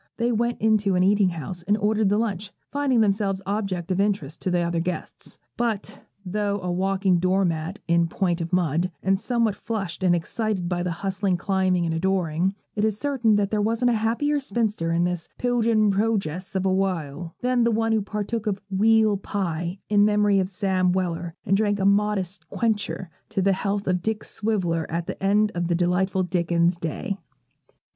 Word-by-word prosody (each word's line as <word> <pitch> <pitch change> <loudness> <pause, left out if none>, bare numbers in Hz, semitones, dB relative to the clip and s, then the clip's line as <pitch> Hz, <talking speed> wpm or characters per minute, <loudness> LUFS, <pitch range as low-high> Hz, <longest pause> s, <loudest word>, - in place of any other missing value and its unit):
They 235 +1 +1
went 235 +1 0
into 210 -3 +2
an 180 - +3
eating 200 0 +4
house, 170 +1 -6
and 205 +4 +1
ordered 215 -1 +2
the 205 - +2
lunch, 205 -3 -2 0.2
finding 280 -5 +2
themselves 200 -2 +1
objects 195 -3 -2
of 185 - 0
interest 195 -7 -1
to - - -1
the 175 -1 +1
other 170 0 0
guests. 180 +2 -5 0.2
But, 215 -3 -3 0.2
though 205 +2 -1
a 180 - -2
walking 190 0 +1
doormat 185 -1 0
in 170 0 +3
point 175 0 -1
of 165 - -4
mud, 175 -1 +1
and 195 0 +2
somewhat 230 -1 +1
flushed 195 -5 -4
and 175 -2 +4
excited 190 +2 -2
by 175 0 -1
the 180 - -1 0.2
hustling, 190 -1 0
climbing, 185 -2 +1
and 165 - -1
adoring, 180 +1 0 0.2
it 210 - 0
is 215 -2 +1
certain 245 -5 +2
there 205 +1 +1
wasn't 230 +3 +2
a - - +2
happier 235 +7 +1
spinster 210 -9 -1
in 170 +1 +2
this 175 -2 -2
'Piljin 230 -4 +2
Projess 195 -4 -1
of 190 0 0
a 190 - +2
wale,' 170 -4 -2
than 250 -1 +2
the 235 - +3
one 225 0 +1
who 220 -1 +2
partook 210 +2 -3
of 200 -2 0
'weal 215 +1 +4
pie' 175 -3 -3
in 205 -1 +4
memory 210 -1 +3
of 185 -1 0
Sam 185 -2 +1
Weller, 175 -2 -2
and 195 - +3
drank 205 0 +1
'a 195 - +1
modest 200 -2 +1
quencher' 210 -6 -2 0.2
to 215 -2 -2
the 195 +1 +3
health 200 +1 -2
of 180 -1 +1
Dick 220 +3 -2
Swiveller 180 -7 -1
at 170 +1 -2
the - - -6
end 205 +2 +3
of 175 -1 -1
that 170 - +1
delightful 185 +2 +1
Dickens 170 -1 +1
day. 190 +5 -4
195 Hz, 185 wpm, -24 LUFS, 180-215 Hz, 0.2 s, eating